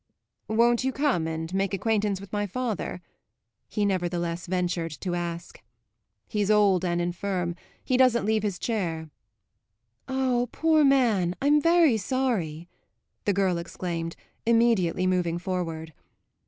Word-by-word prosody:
"Won't 235 +2 +3
you 265 - +1
come 265 - 0
and 160 +2 -4
make 195 0 0
acquaintance 205 -1 0
with 200 0 -12
my 205 0 0
father?" 215 -5 -3 0.6
he 210 -2 -1
nevertheless 175 -3 -1
ventured 180 -2 -1
to 180 - -2
ask. 170 -1 -5 0.7
"He's 210 -2 -1
old 200 -4 +4
and 175 -1 0
infirm 175 0 -2 0.3
he 255 - +2
doesn't 250 -4 +4
leave 220 0 +2
his 200 -3 -2
chair." 165 -9 -3 1.0
"Ah, 255 -2 0
poor 320 -1 +3
man, 230 -11 +3
I'm 295 +2 +4
very 330 -6 +4
sorry!" 190 -9 -1 0.6
the 205 - +2
girl 190 -3 +1
exclaimed, 170 -1 -4 0.3
immediately 225 -7 +2
moving 180 -2 +1
forward. 165 -3 -4
195 Hz, 125 wpm, -26 LUFS, 175-235 Hz, 1.0 s, old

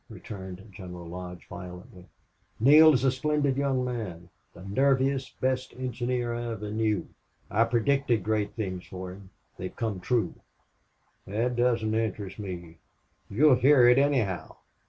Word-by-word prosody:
returned 95 -1 -9
General 90 -2 -9
Lodge, 90 +1 -8
violently. 90 +1 -10 0.5
"Neale 150 +7 +8
is 130 -3 +2
a 135 - +4
splendid 145 +1 0
young 135 -2 0
man 95 -9 -5 0.2
the - - -14
nerviest, 135 +5 +1
best 130 0 -1
engineer 125 -1 -2
I 120 0 -3
ever 105 -1 -6
knew. 110 -2 0 0.4
I 110 +3 +4
predicted 120 -1 +1
great 105 0 -1
things 95 -5 -4
for 95 -1 -7
him. 95 0 -12 0.3
They 90 - -5
have - - -13
come 110 -5 -2
true." 115 +5 0 0.9
"That 115 +5 -1
doesn't 120 -3 +1
interest 105 -3 -2
me." 85 -4 -7 0.5
"You'll 140 +7 +5
hear 130 0 +6
it, 125 +2 +6
anyhow. 130 -10 0
115 Hz, 140 wpm, -28 LUFS, 95-130 Hz, 0.9 s, Neale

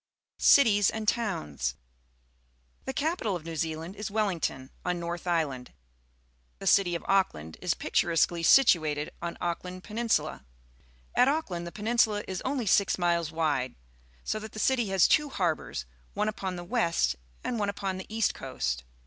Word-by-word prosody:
Cities 205 -8 +6
and 220 -1 -4
Towns. 75 - -1 0.6
— - - -37
The_ca 315 +5 0
pital 205 -4 -1
of 165 -3 -7
New 165 -1 -5
Zealand 160 +3 -3
js 210 -1 -5
Wellmaion, 175 -11 -1
on 180 -1 -1
North 170 +1 -5
Island. 150 -7 -1 0.9
TRelilty'of 175 -4 +2
Auckland 80 - 0
is 180 -1 +1
picturesquely 170 0 +1
situated 155 - +4
on 170 0 -4
Auckland 180 +1 -4
Peninsula. 225 +2 -1 0.7
At 250 - +5
Auckland 195 - -1
the - - -6
peninsula 215 0 +1
is 190 -1 -4
only 260 -2 -2
six 200 0 +3
miles 170 -3 +1
wade, 145 -6 0 0.5
so 215 - -2
that 215 0 -9
the - - -9
city 240 0 +2
has 190 -2 +4
two 300 -1 +3
harbours, 165 - -2 0.3
one 210 +1 0
upon 190 -3 -3
the 175 - -6
west 170 - +1 0.3
and 240 -3 -2
one 205 -1 0
upon 195 -2 -3
the 190 - -8
east 220 -1 +1
coast. 65 - -3
180 Hz, 150 wpm, -28 LUFS, 160-215 Hz, 0.9 s, Cities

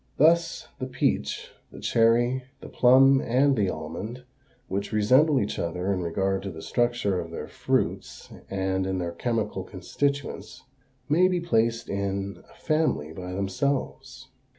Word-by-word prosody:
Thus, 165 +3 +3
the 130 - -3
peach, 125 -1 -1 0.2
the - - -11
cherry, 120 +3 +2
the - - -10
plum, 135 +2 +5
and 135 +3 +3
the 100 -5 +1
almond, 90 +10 -6 0.4
which 100 -1 -3
resemble 130 +8 +4
each 105 - -2
other 90 +3 -1
in 95 - -2
regard 95 +3 -1
to 100 - -5
the 80 -3 -9
structure 120 -6 0
of 85 - -5
their 85 - -6
fruits - - -2 0.2
and 95 -1 -1
in 95 0 -1
their 85 -2 -2
chemical 110 -1 -2
constituents, 140 +11 -3 0.4
may 175 +5 +4
be 180 -1 0
placed 115 -9 +1
in 100 -1 -3
a - - -19
family 155 - 0
by 90 +1 -7
themselves. 130 +6 -3
110 Hz, 145 wpm, -26 LUFS, 95-130 Hz, 0.4 s, plum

